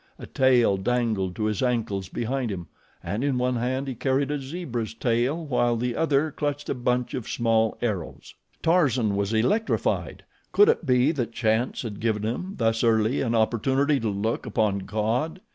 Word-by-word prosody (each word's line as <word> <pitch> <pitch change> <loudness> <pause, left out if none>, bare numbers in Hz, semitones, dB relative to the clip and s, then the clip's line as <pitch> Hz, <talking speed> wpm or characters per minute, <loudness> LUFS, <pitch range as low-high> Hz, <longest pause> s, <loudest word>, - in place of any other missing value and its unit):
A - - -9
tail 125 -6 +3
dangled 105 -4 0
to 110 - -3
his 105 -2 -1
ankles 110 -7 -1
behind 120 +1 -2
him, 90 -3 -5 0.4
and 105 +6 -3
in 140 -3 +1
one 125 0 0
hand 130 +3 -1
he 135 - -2
carried 135 +3 0
a 145 - -1
zebra's 130 - -5
tail 125 +8 0
while 120 -4 +1
the 120 +1 -2
other 155 -1 +1
clutched 145 0 -3
a - - +1
bunch 125 -1 -1
of 125 -4 -4
small 115 -1 +1
arrows. 100 -8 -4 0.3
Tarzan 130 - +2
was 100 +1 -1
electrified. 200 - 0 0.3
Could 415 +2 +6
it 460 - +1
be 125 +3 +4
that 120 -7 -3
chance 110 +2 0
had 105 -4 -6
given 110 -2 0
him 180 - -3
thus 115 -1 +1
early 110 +2 +2
an 120 -3 0
opportunity 135 +6 +2
to 115 - -1
look 105 +5 -2
upon 105 -2 +1
God? 110 - -2
120 Hz, 175 wpm, -25 LUFS, 110-135 Hz, 0.4 s, Could